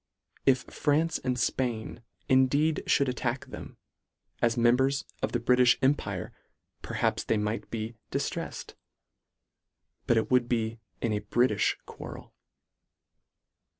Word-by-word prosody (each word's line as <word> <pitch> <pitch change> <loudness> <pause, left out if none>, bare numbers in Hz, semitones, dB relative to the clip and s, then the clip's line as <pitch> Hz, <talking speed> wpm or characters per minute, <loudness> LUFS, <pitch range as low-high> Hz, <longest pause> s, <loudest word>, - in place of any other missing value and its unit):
If 130 -2 +4
France 160 +3 0
and 125 -1 -1
Spain 120 -2 -1 0.3
indeed 140 +4 +3
fhould 140 - +3
attack 125 0 -2
them, - - -9 0.6
as 115 0 +2
members 130 +4 +3 0.2
of - - -1
the 120 - 0
Bri 125 +2 +3
tish 125 -1 +5
empire 110 -9 0 0.5
perhaps - - -1
they 110 - +1
might 105 +2 -2
be 115 0 -4 0.2
diftreffed; - - -3 1.3
but 120 - +4
it 110 - 0
would 125 -2 +3
be 115 -1 -1 0.2
in 115 -2 0
a 105 - -1
Britifh 120 -4 +2
quarrel. - - -10
125 Hz, 120 wpm, -29 LUFS, 115-130 Hz, 1.3 s, tish